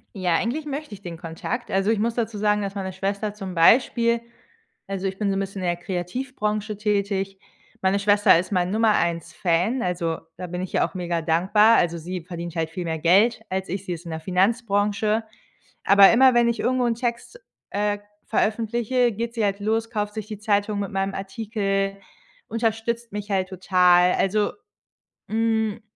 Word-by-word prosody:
Ja, 180 -3 +1
eigentlich 265 - -1
möchte 295 -3 -5
ich 200 - -10
den 175 -3 -7
Kontakt. 170 +9 -5
Also, 195 +2 +1
ich 220 -2 +2
muss 230 +2 0
dazu 225 -2 -2
sagen, 210 0 +2
dass 200 0 -4
meine 190 -1 -3
Schwester 200 +2 -2
zum 195 -3 -7
Beispiel 235 +6 +4 0.7
also, 195 0 -3
ich 190 0 -4
bin 205 -1 0
so 195 - -1
'n - - 0
bisschen 195 0 -4
in 180 - -1
der 175 0 0
Kreativbranche 210 +4 -3
tätig. 200 -2 -1 0.4
Meine 190 +1 +2
Schwester 205 -2 +5
ist 185 +3 -5
mein 180 -2 +1
Nummer-1-Fan, 185 - +1
also, 170 -2 -1 0.2
da 180 - -6
bin 180 +1 -4
ich 185 - -6
ihr - - +3
auch - - -9
megadankbar. 180 +5 +3
Also, 170 -1 +1
sie 180 +2 -5
verdient 170 -1 -6
halt 160 -1 -1
viel 180 +1 -4
mehr 160 -1 -2
Geld 195 +9 +4
als 190 0 -3
ich, 190 +2 -4
sie 180 - -3
ist 170 0 -8
in 170 - -6
der 160 - -4
Finanzbranche. 205 +3 +1 0.6
Aber 200 0 +8
immer, 260 +3 +6
wenn 240 0 +4
ich 235 - -1
irgendwo 255 0 +1
'n 235 - +1
Text, 235 - -4 0.3
äh, 205 0 0 0.3
veröffentliche, 235 +3 +1
geht 230 +3 -4
sie 225 -3 0
halt 200 0 -1
los, 225 +2 -1
kauft 210 -2 -3
sich 215 -2 -5
die 215 -2 -7
Zeitung 205 -1 0
mit 200 - -3
meinem 195 0 -1
Artikel, 195 -1 -2 0.5
unterstützt 230 0 -2
mich 205 0 -6
halt 190 -1 0
total. 180 -1 +4
Also, 205 +2 +1 0.8
hm 220 -1 0
200 Hz, 180 wpm, -24 LUFS, 185-225 Hz, 0.8 s, Aber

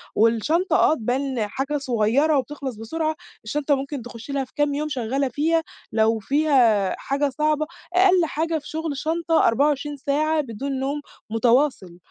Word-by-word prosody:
والشنطة 235 - +2
آه - - +5
تبان 250 -3 -1
حاجة 270 +6 -2
صغيّرة 270 +3 +2
وبتخلص 265 -1 -4
بسرعة، 310 +9 -2 0.3
الشنطة 285 +5 0
ممكن 275 0 -5
تخشّ 235 +3 -9
لها 275 -1 0
في 260 - -27
كام 290 -1 +1
يوم 300 +2 -2
شغّالة 270 +1 -1
فيها، 320 +5 +1 0.3
لو 220 0 +2
فيها 245 -6 +3
حاجة 280 +1 0
صعبة 305 0 +1 0.3
أقل 365 -1 +5
حاجة 325 +1 -1
في 295 - -9
شغل 315 -3 -3
شنطة 325 +1 +1
24 290 +3 +1
ساعة 305 +3 +1
بدون 265 +2 -4
نوم 280 +2 -2 0.3
متواصل، 230 -5 +1
280 Hz, 150 wpm, -23 LUFS, 240-305 Hz, 0.3 s, آه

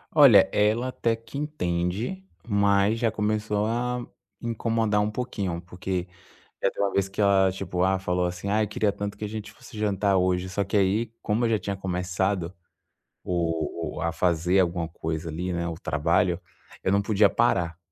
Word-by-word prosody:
Olha, 130 -11 +8
ela 110 +4 +2
até 115 -2 0
que 115 +4 -10
entende, 115 - -2 0.2
mas 100 0 +3
já 115 -3 +2
começou 105 -1 0
a 120 +2 -1 0.4
incomodar 115 -2 0
um 105 +1 0
pouquinho, 100 -8 -3
porque 90 0 -4 0.5
já - - +2
teve - - -2
uma 100 - 0
vez 100 0 +1
que 95 - -5
ela, 100 -2 +4
tipo, 90 -1 -3
ah, 95 0 +2
falou 90 -1 0
assim: 90 +3 -4
"Ai, 105 +1 +2
queria 105 0 0
tanto 100 0 -5
que 105 - -6
a - - -3
gente 105 -1 -6
fosse 110 - -12
jantar 100 -2 +1
hoje". 90 0 +1
Só 100 +2 -1
que 100 +2 -2
aí, 105 +4 +2
como 110 +3 0
eu - - 0
já 110 - +3
tinha 100 -1 -4
começado 90 -1 -1 0.7
o 85 -2 -1 0.3
o - - -4
a 85 +1 0
fazer 90 +2 +2
alguma 85 -2 +1
coisa 80 0 -4
ali, 90 +4 -3
né, 85 0 -2
o 85 - -3
trabalho, 85 +3 +1 0.4
eu - - +1
não 100 +1 +3
podia 100 0 +4
parar. 85 -8 +1
100 Hz, 180 wpm, -26 LUFS, 90-110 Hz, 0.7 s, Olha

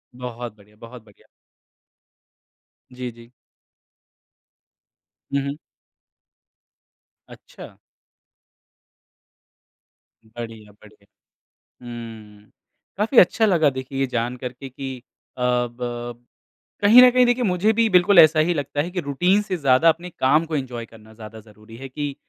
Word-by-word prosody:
बहुत 120 -2 -7
बढ़िया, 105 +1 -22
बहुत 115 0 -12
बढ़िया। 105 - -23 1.7
जी, 125 -1 -6
जी। 115 +1 -17 2.0
हुँ, 140 - +1
हुँ। 145 +2 -5 1.7
अच्छा। - - -14 2.5
बढ़िया, 110 -2 -10
बढ़िया। 105 0 -21 0.8
हुँ, 110 -3 -11 0.5
काफ़ी 225 +4 -1
अच्छा 220 +5 +4
लगा 165 -7 +3
देखिए 130 0 -6
ये 135 - +1
जान 120 0 -3
कर 125 0 -6
के 135 +2 -10
कि 130 0 -7 0.4
अ, - - -7
ब 120 -1 -3 0.6
कहीं 230 +5 +8
न 250 - +8
कहीं 250 0 +4
देखिए 245 0 +1
मुझे 190 +3 +1
भी 225 0 +2
बिल्कुल 180 +1 +4
ऐसा 155 -1 +7
ही 175 - +1
लगता 145 0 -3
है 175 - -6
कि 180 -1 -3
रूटीन 180 +8 +1
से 185 -3 -4
ज़्यादा 140 +1 +3
अपने 170 +3 0
काम 150 +3 +1
को 155 -1 -3
एन्जॉय 120 -4 -5
करना 110 -1 -17
ज़्यादा 110 0 -11
ज़रूरी 110 +1 -16
है 135 +2 -9
कि 145 +1 -5
130 Hz, 125 wpm, -22 LUFS, 115-165 Hz, 2.5 s, कहीं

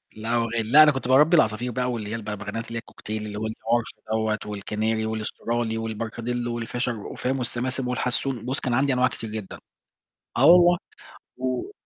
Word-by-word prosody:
لا 110 +1 -5
هو 120 -1 +3
غالي، 115 0 -1
لأ، 155 +2 +10
أنا 150 - +6
كنت 135 -2 -4
باربي 150 +6 +6
العصافير 120 0 +2
بقى، 125 +1 -1
واللي 110 -3 -4
هي 115 - -3
البغبغانات 115 +1 -5
اللي 115 - -5
هي - - -1
الكوكتيل 110 -1 -6
اللي 105 -1 -6
هو 110 - -2
الParrot 115 +1 0 0.3
دوّة، 110 -1 +1
والCanary، 110 +2 -2
والAustrali، 110 +1 -2
وال 115 -1 -4
Parakeet، 115 +2 -4
والFisher، 120 -1 -3
فاهم؟ 130 0 -1
والSiskin، 125 +2 -2
والHasson، 125 -1 -1
بُص، 130 +2 -1
كان 125 -3 -2
عندي 135 +1 +2
أنواع 125 0 +3
كتير 115 - -6
جدًا. 105 -3 -6 0.8
آه 135 +4 +5
والله، 175 +1 +7 0.6
و 130 - -2
115 Hz, 180 wpm, -25 LUFS, 110-130 Hz, 0.8 s, لأ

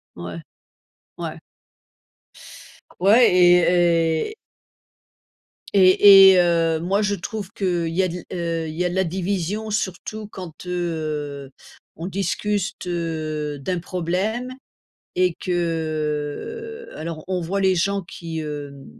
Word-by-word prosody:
Ouais, 85 -1 -7 0.8
ouais. - - -5 1.6
Ouais 215 +7 +6
et 175 -2 +4
et - - -13 1.4
Et 195 0 +8
et, 185 - +5
heu, 165 -2 +2
moi 190 +5 0
je 205 -1 +1
trouve 200 +1 -6
que 175 -5 -1
il 165 - -4
y 185 - +2
a - - +2
de 175 - -5 0.2
la - - -4
heu, 165 -1 -2
il 155 - -7
y 180 +2 -1
a - - +1
de 175 - -5
la 190 - +2
division 190 +4 -2
surtout 215 +1 -3
quand, 180 -5 -10
heu, 155 -6 -3 0.5
on 165 +3 -5
discute, 195 0 -2
heu, 155 -4 -3
d'un 180 +6 -2
problème 185 +8 -2 0.6
et 180 -2 +2
que 165 - -3
alors 160 -1 -6
on 185 -1 -1
voit 190 +4 -2
les 190 -1 +3
gens 195 +3 0
qui, 165 -2 -7
hem 145 -3 -7
175 Hz, 130 wpm, -22 LUFS, 160-195 Hz, 1.6 s, Et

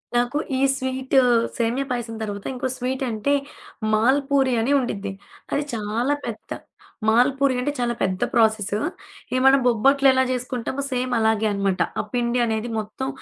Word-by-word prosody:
నాకు 245 +4 +1 0.2
ఈ - - -1 0.2
స్వీటూ 260 0 +1 0.4
సేమ్యా 235 +4 0
పాయసం 240 -2 -3
తర్వాత 205 -2 -5
ఇంకో 255 +1 -2
స్వీటు 260 +1 -2
అంటే, 220 +7 0 0.6
మాల్ 245 +6 +4
పూరి 270 -2 +3
అని 260 +5 0
ఉండిద్ది. 205 -5 -3 0.4
అది 290 - +1
చాలా 225 +6 -1
పెద్ద 230 -2 -7 0.6
మాల్పూరి 260 +4 +3
అంటే 290 +4 -1
చాలా 240 -1 0
పెద్ద 185 -1 0
ప్రాసెసు. 220 -3 +2 0.5
ఇవి 255 - +1
మనం 270 0 +7
బొబ్బట్లు 275 +4 +4
ఎలా 260 0 +3
జేసుకుంటామో 250 +1 -3
సేమ్ 255 0 -2
అలాగే 220 -1 +2
అనమాట. 195 -2 0 0.2
ఆ - - +3
పిండి 245 0 0
అనేది 220 +1 -2
మొత్తం 220 +5 -5
245 Hz, 150 wpm, -23 LUFS, 220-260 Hz, 0.6 s, మనం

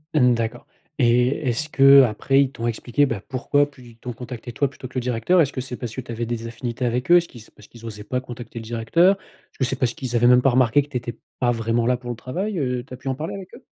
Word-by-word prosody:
Mmh, 125 -4 +5
d'accord. 115 +1 -3 0.3
Et 120 -1 +4 0.2
est-ce 125 +6 -1
qu'après 135 -1 +5
ils 135 -2 +1
t'ont 115 -3 -4
expliqué, 120 +4 +1
bah, 115 -7 -3
pourquoi 145 +2 +1
plu 140 -3 -17
ils 115 - -18
t'ont 125 +2 -6
contacté 120 +1 -8
toi 140 +5 0
plutôt 130 -1 -10
que 130 - -20
le - - +1
directeur? 125 +9 +1
Est-ce 145 -4 +2
que 130 - -3
c'est 125 -1 -7
parce 120 -3 -6
que 130 - -4
tu 120 - -10
avais 115 +1 -3
des 115 0 -4
affinités 120 +2 -5
avec 125 +3 -1
eux? 175 - +9
Est-ce 170 -1 +1
qu'ils 120 - -13
s 110 - -17
parce 105 - -18
qu'ils 115 -1 -14
osaient 105 -2 -7
pas 125 +4 -2
contacter 120 -2 -9
le - - -8
directeur? 120 - +3
Est-ce - - -26
que - - +1
c'est 130 - -1
parce 125 -2 0
qu'ils 125 -3 -5
avaient 120 +1 +4
même 125 0 +6
pas 135 - +4
remarqué 130 +2 +4
que 145 - -11
tu 125 - -2
étais 120 -1 -6 0.2
pas 120 -1 +2
vraiment 115 0 0
là 125 - +3
pour 120 0 -9
le 120 - -3
travail? 185 - -4
Heu, 125 -3 -1
tu - - -29
as 125 - -7
pu 130 - -11
en 130 - 0
parler 160 +8 -5
avec 190 -2 -10
eux? - - -15
125 Hz, 290 wpm, -22 LUFS, 115-135 Hz, 0.3 s, eux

